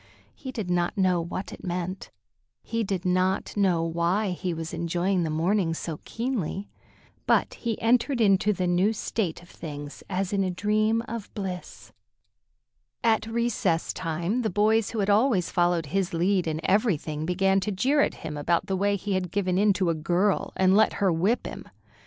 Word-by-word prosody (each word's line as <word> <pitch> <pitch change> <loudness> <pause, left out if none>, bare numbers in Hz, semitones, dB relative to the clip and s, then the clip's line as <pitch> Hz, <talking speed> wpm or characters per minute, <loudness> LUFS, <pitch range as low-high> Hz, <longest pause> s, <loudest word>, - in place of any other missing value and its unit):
He 260 - -8
did 215 -8 -4
not 175 +3 0
know 185 -3 +3
what 180 +3 -5
it - - -11
meant; 180 +1 -4 0.5
he 230 0 -2
did 190 -3 -3
not 185 +1 +1
know 185 -5 +2
why 170 +5 0
he 180 0 -3
was 165 0 -5
enjoying 175 +3 0
the 165 - -1
morning 165 +2 +1
so 160 -2 -5
keenly; 225 -6 -3 0.6
but - - +3
he 230 -3 -3
entered 245 +3 +2
into 205 -1 +4
the 185 -2 -1
new 180 +5 +2
state 195 -5 -3
of 175 - -18
things 145 -2 -8
as 190 0 -2
in 195 -1 +2
a 185 - 0
dream 215 +4 +1
of 230 -2 -6
bliss. 190 -4 -6 1.1
At 220 -1 +2
recess 225 -7 0
time 175 +7 -2
the 220 - 0
boys 215 +3 +2
who 225 - -2
had 200 - 0
always 210 -4 +3
followed 175 -2 +2
his 185 +3 -1
lead 180 +1 +1
in 160 0 -2
everything 160 -7 0
began 195 +2 +2
to 210 +2 -2
jeer 270 +10 +2
at - - +1
him 150 - -4
about 170 +4 +1
the 190 -1 -1
way 200 +2 +1
he 200 +1 -3
had 185 -1 -1
given 185 -1 0
in 205 0 +5
to 185 -3 +1
a - - +1
girl 175 +6 0
and 190 0 +4
let 220 +1 +4
her 195 -2 +1
whip 195 +9 +1
him. - - -7
190 Hz, 180 wpm, -26 LUFS, 175-210 Hz, 1.1 s, in